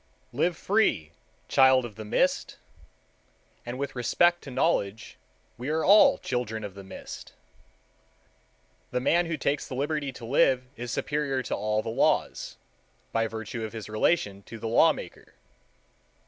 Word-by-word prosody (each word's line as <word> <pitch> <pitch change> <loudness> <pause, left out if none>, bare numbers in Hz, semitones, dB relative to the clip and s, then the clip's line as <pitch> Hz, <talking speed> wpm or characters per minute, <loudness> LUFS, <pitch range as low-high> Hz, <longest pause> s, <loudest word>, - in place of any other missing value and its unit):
Live 165 +6 0
free, 145 - +1 0.4
child 130 -1 +5
of 115 - -8
the 110 - -8
mist—and 120 +3 -5
with 140 0 -4
respect 175 +8 +2
to - - -10
knowledge 110 -4 -1 0.4
we 125 +4 -4
are 160 +1 0
all 205 +2 +7
children 110 -4 -3
of 100 -2 -6
the 100 0 -10
mist. 95 - -10 1.6
The - - -1
man 170 +7 +2
who 165 -1 -2
takes 140 0 -1
the 130 - -6
liberty 145 +1 -1
to 120 - -9
live 130 0 +3
is 120 -2 -6
superior 140 0 -1
to - - -2
all 105 0 -1
the - - -4
laws, 115 - 0 0.5
by 115 0 +1
virtue 110 +1 -6
of 110 - -5
his 110 -3 -7
relation 105 - 0
to 115 - -8
the 115 - -5
law 115 - +5
maker. - - -10
125 Hz, 150 wpm, -27 LUFS, 110-145 Hz, 1.6 s, all